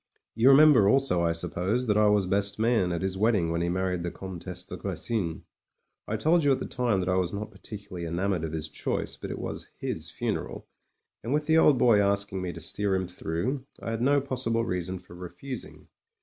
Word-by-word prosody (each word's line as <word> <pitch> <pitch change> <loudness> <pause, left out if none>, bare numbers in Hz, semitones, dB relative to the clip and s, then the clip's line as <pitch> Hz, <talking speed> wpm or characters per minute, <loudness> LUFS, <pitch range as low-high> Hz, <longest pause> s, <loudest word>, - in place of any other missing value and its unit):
You 115 +4 +4
remember 135 -7 +7
also, 135 -8 +3
I 85 - +2
suppose, 90 +8 -1
that 105 -3 +1
I 105 0 +4
was 105 -2 +3
best 100 +2 0
man 110 -5 +2
at 85 +1 -2
his 95 0 -2
wedding 105 -7 +2
when 85 0 -1
he 85 - 0
married 90 0 -1
the 85 - -2
Comtesse 90 0 -7
de 100 - -7
Grecin. 95 -2 -3 0.6
I 110 - -1
told 160 +8 +3
you 145 - +4
at 135 - +3
the 130 - -5
time 120 -7 0
that 90 - -3
I 95 0 +2
was 90 -2 0
not 105 +1 -5
particularly 100 -3 -8
enamoured 90 +1 -1
of 80 - -3
his 80 -1 -3
choice, - - -3
but - - -8
it - - -4
was - - -6
his - - -4
funeral; - - -4 0.6
and 120 +6 0
with 150 0 0
the 160 +1 +4
old 150 -4 +5
boy 115 -3 +5
asking 100 -1 0
me 90 -1 -3
to - - -9
steer 100 -2 0
him 95 -1 -1
through, 90 - -3
I 115 - -4
had 115 0 -3
no 140 +3 +4
possible 125 -4 -1
reason 90 0 -3
for 90 -1 -14
refus 90 +10 -7
ing. - - -16
100 Hz, 220 wpm, -27 LUFS, 90-120 Hz, 0.6 s, remember